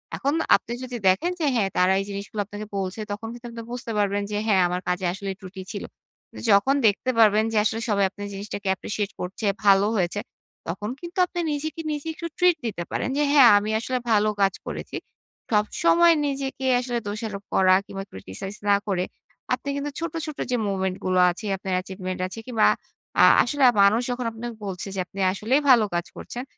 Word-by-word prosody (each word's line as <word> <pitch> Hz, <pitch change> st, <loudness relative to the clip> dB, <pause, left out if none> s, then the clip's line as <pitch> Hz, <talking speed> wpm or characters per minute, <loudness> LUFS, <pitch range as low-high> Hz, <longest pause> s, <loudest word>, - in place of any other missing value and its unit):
এখন 280 Hz, +2 st, -1 dB, 0.2 s
আপনি 235 Hz, -, -3 dB
যদি 250 Hz, -1 st, -5 dB
দেখেন 250 Hz, -, +3 dB
যে 320 Hz, -, 0 dB
হ্যাঁ, 205 Hz, -5 st, +2 dB
তারা 180 Hz, +1 st, +4 dB
এই 195 Hz, -, -3 dB
জিনিসগুলো 200 Hz, +1 st, -4 dB
আপনাকে 205 Hz, +1 st, -7 dB
বলছে, 190 Hz, +2 st, -3 dB
তখন 205 Hz, +2 st, -5 dB
কিন্তু 240 Hz, 0 st, -11 dB
আপনি 230 Hz, 0 st, -7 dB
বুঝতে 245 Hz, -1 st, -5 dB
পারবেন 205 Hz, 0 st, +1 dB
যে 205 Hz, -, -1 dB
হ্যাঁ, 195 Hz, -3 st, +4 dB
আমার 180 Hz, +1 st, -2 dB
কাজে 180 Hz, +1 st, -1 dB
আসলে 195 Hz, +1 st, -5 dB
ত্রুটি 190 Hz, 0 st, -9 dB
ছিল। 200 Hz, -, -5 dB, 0.7 s
যখন 200 Hz, +8 st, +4 dB
দেখতে 210 Hz, +5 st, 0 dB
পারবেন 215 Hz, -1 st, +6 dB
যে 220 Hz, -, 0 dB
আসলে 220 Hz, +2 st, 0 dB
সবাই 200 Hz, -2 st, +3 dB
আপনার 205 Hz, +1 st, -8 dB
জিনিসটাকে 200 Hz, 0 st, -6 dB
Appreciate 205 Hz, +1 st, -4 dB
করছে, 185 Hz, +4 st, -5 dB, 0.2 s
ভালো 195 Hz, 0 st, +6 dB
হয়েছে, 185 Hz, 0 st, 0 dB, 0.5 s
তখন 190 Hz, +5 st, -4 dB
কিন্তু 345 Hz, +1 st, -9 dB
আপনি 350 Hz, -, -6 dB
নিজেকে, 305 Hz, +2 st, -3 dB
নিজে 295 Hz, +1 st, -4 dB
একটু 335 Hz, +1 st, -6 dB
ট্রিট 355 Hz, -1 st, +4 dB
দিতে 200 Hz, -6 st, -3 dB
পারেন -, -, -1 dB
যে 295 Hz, -, +3 dB
হ্যাঁ, 270 Hz, -5 st, +8 dB
আমি 205 Hz, +1 st, -1 dB
আসলে 255 Hz, +3 st, -2 dB
ভালো 215 Hz, 0 st, +4 dB
কাজ 195 Hz, -1 st, +4 dB
করেছি। -, -, -5 dB, 0.5 s
সবসময় 335 Hz, +11 st, +4 dB
নিজেকে 270 Hz, -1 st, -3 dB
আসলে 245 Hz, -1 st, -2 dB
দোষারোপ 205 Hz, -1 st, -4 dB
করা 185 Hz, -1 st, +5 dB
কিংবা 195 Hz, 0 st, -6 dB
Criticize 100 Hz, -, -7 dB
না 200 Hz, -, +6 dB
করে, 185 Hz, -3 st, 0 dB, 0.5 s
আপনি 285 Hz, -, -3 dB
কিন্তু 285 Hz, +1 st, -3 dB
ছোট, 335 Hz, -1 st, -3 dB
ছোট 305 Hz, -2 st, -6 dB
যে 250 Hz, -, +2 dB
moment 190 Hz, -1 st, -1 dB
গুলো 185 Hz, 0 st, +2 dB
আছে, 185 Hz, +5 st, -8 dB
আপনার 190 Hz, -1 st, -4 dB
achievement 185 Hz, -1 st, -6 dB
আছে 190 Hz, +5 st, -8 dB
কিংবা 225 Hz, -4 st, +2 dB, 0.6 s
আ -, -, +8 dB, 0.2 s
আসলে 280 Hz, +3 st, -1 dB, 0.2 s
মানুষ 210 Hz, +4 st, +4 dB
যখন 245 Hz, 0 st, -3 dB
আপনাকে 230 Hz, +1 st, -7 dB
বলছে 190 Hz, 0 st, -5 dB
যে, 190 Hz, -, -3 dB
আপনি 195 Hz, -, -11 dB
আসলেই 230 Hz, +9 st, +1 dB
ভালো 235 Hz, -4 st, +7 dB
কাজ 175 Hz, 0 st, -1 dB
করছেন, 245 Hz, -, -6 dB
210 Hz, 190 wpm, -24 LUFS, 195-250 Hz, 0.7 s, হ্যাঁ